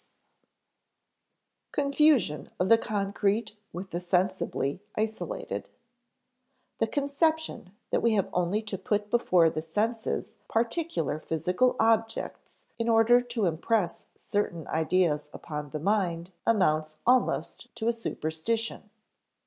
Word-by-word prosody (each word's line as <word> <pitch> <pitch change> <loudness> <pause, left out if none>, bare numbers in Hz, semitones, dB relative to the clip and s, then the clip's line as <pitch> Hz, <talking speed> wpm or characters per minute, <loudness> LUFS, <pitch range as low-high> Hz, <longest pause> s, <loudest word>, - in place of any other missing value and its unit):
[Sidenote: - - -52 0.2
Confusion 280 - +3
of 180 +2 +1
the 230 - +8
concrete 210 +1 -1 0.2
with 185 +2 -7
the 175 - -2
sensibly 180 -4 0
isolated] 220 0 -3 1.1
The - - +2
conception 285 - -1 0.2
that - - +2
we 230 -1 +3
have 200 -3 +2
only 180 +5 +1
to 210 -3 -4
put 205 +1 -1
before 180 -9 +4
the 155 - -3
senses 220 +8 -2 0.2
particular 230 - -1
physical 180 +11 +1
objects 225 0 0
in 230 0 0
order 230 +2 +6
to 240 -3 -2
impress 175 +3 0
certain 180 -6 -2
ideas 160 -2 +1
upon 150 -2 -6
the 155 - -4
mind 175 -1 0 0.2
amounts 155 -8 +2
almost 250 +1 +1
to 230 -1 -3
a 235 - +3
superstition. 225 +1 -3
205 Hz, 115 wpm, -28 LUFS, 170-230 Hz, 1.1 s, the